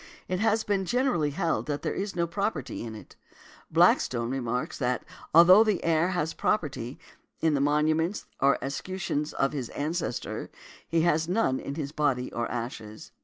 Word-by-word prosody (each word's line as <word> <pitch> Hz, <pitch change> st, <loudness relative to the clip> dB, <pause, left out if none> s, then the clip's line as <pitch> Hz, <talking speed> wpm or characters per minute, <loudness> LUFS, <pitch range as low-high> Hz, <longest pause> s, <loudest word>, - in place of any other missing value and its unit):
It 185 Hz, 0 st, -1 dB
has 220 Hz, +1 st, +2 dB
been 200 Hz, -2 st, 0 dB
generally 240 Hz, -, +1 dB
held 165 Hz, +2 st, -1 dB
that 145 Hz, -1 st, -3 dB
there -, -, -1 dB
is 200 Hz, 0 st, -4 dB
no 170 Hz, -1 st, +1 dB
property 170 Hz, -, -3 dB
in 115 Hz, -2 st, -6 dB
it. 105 Hz, -, -12 dB, 0.5 s
Blackstone 120 Hz, -1 st, +3 dB
remarks, 125 Hz, -2 st, -2 dB
that, 125 Hz, -2 st, -1 dB, 0.3 s
although 180 Hz, +6 st, +8 dB
the 215 Hz, -4 st, 0 dB
heir 165 Hz, +1 st, +3 dB
has 175 Hz, -4 st, -1 dB
a -, -, -29 dB
property 140 Hz, -, -1 dB, 0.4 s
in 160 Hz, -1 st, +2 dB
the 140 Hz, -, +1 dB
monuments 155 Hz, +5 st, +1 dB
or 140 Hz, +1 st, +4 dB
escutcheons 150 Hz, +1 st, -3 dB
of 135 Hz, +1 st, 0 dB
his 130 Hz, -5 st, -4 dB
ancestor, 155 Hz, -3 st, -3 dB, 0.4 s
he 165 Hz, 0 st, +2 dB
has 160 Hz, -1 st, +2 dB
none 180 Hz, -9 st, +1 dB
in 140 Hz, -, -5 dB
his 145 Hz, -3 st, -4 dB
body 140 Hz, -5 st, 0 dB
or 120 Hz, 0 st, -2 dB
ashes. 115 Hz, -3 st, -6 dB
150 Hz, 170 wpm, -28 LUFS, 135-180 Hz, 0.5 s, although